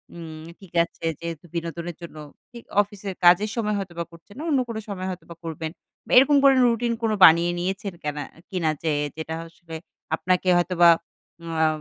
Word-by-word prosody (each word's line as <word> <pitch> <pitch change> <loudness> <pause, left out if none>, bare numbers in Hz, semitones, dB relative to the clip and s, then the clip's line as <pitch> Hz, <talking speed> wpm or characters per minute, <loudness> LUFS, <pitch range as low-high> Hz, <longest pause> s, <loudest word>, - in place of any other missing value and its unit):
উম 160 -2 -9 0.2
ঠিক 190 -3 -16
আছে 170 - -9
যেহেতু 170 0 -6
বিনোদনের 170 0 -4
জন্য, 170 -2 -9 0.3
থি 240 - -12 0.2
অফিসের 205 -2 -6
কাজের 180 +5 +6
সময় 210 -3 0
হয়তোবা 170 -3 -5
করছেন 170 +6 -16
না, 300 - -6
অন্য 275 -3 +3
কোনো 225 -1 -3
সময় 185 -2 -4
হয়তোবা 170 -2 -8
করবেন। 160 -1 -5 0.3
বা - - -10
এরকম 280 +3 +7
করে 275 -1 +7
রুটিন 235 0 +1
কোন 225 - +2
বানিয়ে 170 +2 +6
নিয়েছেন 190 +2 -3
কেনা 150 0 -3 0.3
কিনা? 175 -4 0
যে, 160 - +1 0.3
যেটা 160 0 -5
আসলে 165 0 -11 0.4
আপনাকে 185 +2 0
হয়তোবা 175 -1 +4 0.6
ওয়া 160 -1 +1
175 Hz, 170 wpm, -24 LUFS, 165-205 Hz, 0.6 s, এরকম